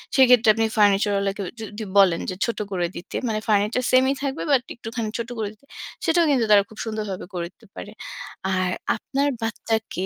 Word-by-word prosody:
সেক্ষেত্রে 250 -4 +6
আপনি 225 +1 +1
ফার্নিচার 205 0 +4
ওয়ালাকে 200 0 -1 0.2
যু - - -5
যদি 210 +1 -6
বলেন 185 -4 +5
যে 185 - -3
ছোট 235 - -3
করে 175 -2 0
দিতে। 175 - -8
মানে 215 -1 0
ফার্নিচার 210 +3 +2
সেইমই 260 +1 +5
থাকবে 275 +1 -2
বাট 270 -3 +5
একটুখানি 230 -1 -4
ছোট 235 0 -4
করে 215 -2 -2
দিতে। 215 +6 -26 0.4
সেটাও 335 0 +4
কিন্তু 250 -5 +3
তারা 205 -1 +8
খুব 215 - -15
সুন্দরভাবে 215 -4 -4
করে 170 -1 -3
দিতে 225 - -22
পারে। 205 - -8 0.6
আর 185 0 +1 0.3
আপনার 280 +1 -1
বাচ্চাকে 225 -4 -2
220 Hz, 185 wpm, -23 LUFS, 200-240 Hz, 0.6 s, তারা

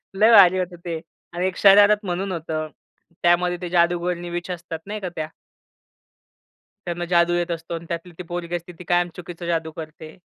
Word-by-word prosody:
लय 215 +4 +5
भारी 185 -4 +8
होते 180 -1 -3
ते. 165 -2 -3 0.3
आणि 175 +1 -1
एक 185 - -4
शरारत 205 +1 +6
म्हणून 190 +2 -2
होतं. 160 -2 -3 0.6
त्यामध्ये 175 +1 +3
ते 180 - -4
जादूगरणी 175 0 +1
विच 175 +1 -5
असतात 170 -2 -6
नाही 210 +2 -5
का 190 -3 -4
त्या 155 -1 -3 1.6
त्यांना 175 0 -3
जादू 175 -1 +3
येत 175 0 0
असतो 165 0 -5
आणि 165 0 -5
त्यातली 170 +1 -5
ती 180 - -6
पोरगी 175 0 -4
असते. 175 +1 -6
ती - - -8
कायम 175 0 +2
चुकीचा 175 -1 -8
जादू 165 -2 -1
करते. 155 0 -10
175 Hz, 180 wpm, -23 LUFS, 170-180 Hz, 1.6 s, भारी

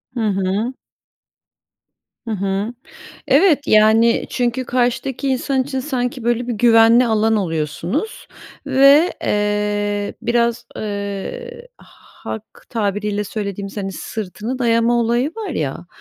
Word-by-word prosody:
Hı - - -3
hı. 195 +5 -1 1.5
Hı - - -2
hı. 200 +3 -2 0.6
Evet, 290 0 +4
yani, 220 +2 +4
çünkü 250 +1 -1
karşıdaki 255 +2 -1
insan 265 0 0
için 265 -1 -3
sanki, 250 -3 -3
böyle, 240 +1 0
bir - - 0
güvenli 230 +2 +5
alan 220 0 +2
oluyorsunuz 170 - -3 0.4
ve, 275 +5 +5
eee, 205 0 -1
biraz, 235 0 0
eee, 215 - -5
halk 220 - -10 0.3
tabiriyle 210 -1 -1
söylediğimiz, 200 -1 -5
hani, 195 -2 -3
sırtını 220 +6 -5
dayama 230 -1 +2
olayı 240 +5 +1
var 430 -4 -4
ya, 165 - -3
230 Hz, 110 wpm, -19 LUFS, 205-255 Hz, 1.5 s, güvenli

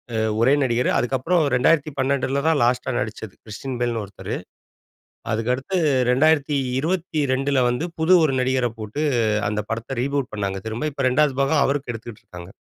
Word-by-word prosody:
அ - - 0 0.2
ஒரே 130 +4 +5
நடிகர். 125 -1 +1
அதுக்கப்புறம் 135 +8 +1
2012ல 140 0 +1
தான் 160 -3 +3
லாஸ்ட்டா 125 +1 +1
நடிச்சது. 110 -2 -5
கிறிஸ்டியன் 125 +4 -6
பெல்னு 120 -2 0
ஒருத்தரு. 100 -1 -6 1.0
அதுக்கு 115 +2 0
அடுத்து 135 +9 -3 0.3
2022ல 140 0 +1
வந்து, 125 +8 -2
புது 160 +3 +4
ஒரு 135 -3 0
நடிகர 130 -1 +1
போட்டு 110 +8 -4 0.5
அந்த 105 0 -1
படத்த 115 +3 -4
ரீபூட் 140 0 -2
பண்ணாங்க 100 -2 -2
திரும்ப. 115 +8 -2
இப்ப 140 - -3
2வது 140 +1 +2
பாகம் 140 +1 +3
அவருக்கு 140 -2 -1
எடுத்துட்ருக்காங்க. 105 -6 -10
130 Hz, 140 wpm, -22 LUFS, 120-145 Hz, 1.0 s, ஒரே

